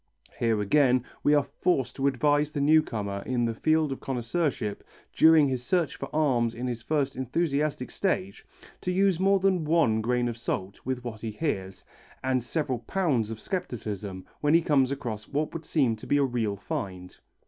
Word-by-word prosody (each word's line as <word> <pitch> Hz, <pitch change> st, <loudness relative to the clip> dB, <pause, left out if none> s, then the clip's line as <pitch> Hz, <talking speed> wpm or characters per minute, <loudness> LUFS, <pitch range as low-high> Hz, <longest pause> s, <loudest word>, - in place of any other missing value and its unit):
Here 115 Hz, -2 st, +2 dB
again 125 Hz, +3 st, +3 dB, 0.2 s
we 145 Hz, -, +4 dB
are 145 Hz, -, +4 dB
forced 140 Hz, -4 st, -1 dB
to 135 Hz, 0 st, +1 dB
advise 145 Hz, +2 st, +2 dB
the 150 Hz, -, -4 dB
new 155 Hz, +3 st, +5 dB
comer 100 Hz, -8 st, -4 dB
in 125 Hz, -2 st, 0 dB
the 115 Hz, -, -1 dB
field 155 Hz, +5 st, +1 dB
of 135 Hz, -, -4 dB
connoisseurship 125 Hz, -3 st, -2 dB, 0.3 s
during 160 Hz, -2 st, +6 dB
his 130 Hz, -2 st, -2 dB
search 170 Hz, +3 st, 0 dB
for 135 Hz, -, -6 dB
arms 125 Hz, -7 st, +1 dB
in 120 Hz, +2 st, -4 dB
his 120 Hz, -2 st, -3 dB
first 140 Hz, -1 st, -1 dB
enthusiastic 140 Hz, +1 st, -1 dB
stage, 195 Hz, 0 st, -2 dB, 0.4 s
to 180 Hz, -, -1 dB
use 190 Hz, -1 st, +2 dB
more 195 Hz, +1 st, +4 dB
than 185 Hz, -3 st, +2 dB
one 150 Hz, -9 st, +2 dB
grain 120 Hz, +2 st, +1 dB
of 120 Hz, -1 st, -4 dB
salt 95 Hz, -3 st, -3 dB
with 130 Hz, -1 st, -3 dB
what 110 Hz, -3 st, -6 dB
he 115 Hz, -, -3 dB
hears, 95 Hz, -, -3 dB, 0.4 s
and 130 Hz, -2 st, +1 dB
several 130 Hz, -1 st, -2 dB
pounds 125 Hz, -, 0 dB
of 110 Hz, -1 st, -6 dB
scepticism 105 Hz, -, -5 dB
when 150 Hz, +2 st, +3 dB
he 165 Hz, -, +4 dB
comes 135 Hz, -5 st, +3 dB
across 115 Hz, -6 st, -4 dB
what 150 Hz, +2 st, -2 dB
would 165 Hz, -1 st, -6 dB
seem 135 Hz, -8 st, +2 dB
to -, -, -11 dB
be 145 Hz, -, +3 dB
a 140 Hz, -, +3 dB
real 120 Hz, -6 st, -1 dB
find. 95 Hz, -2 st, -6 dB
130 Hz, 185 wpm, -27 LUFS, 115-155 Hz, 0.4 s, during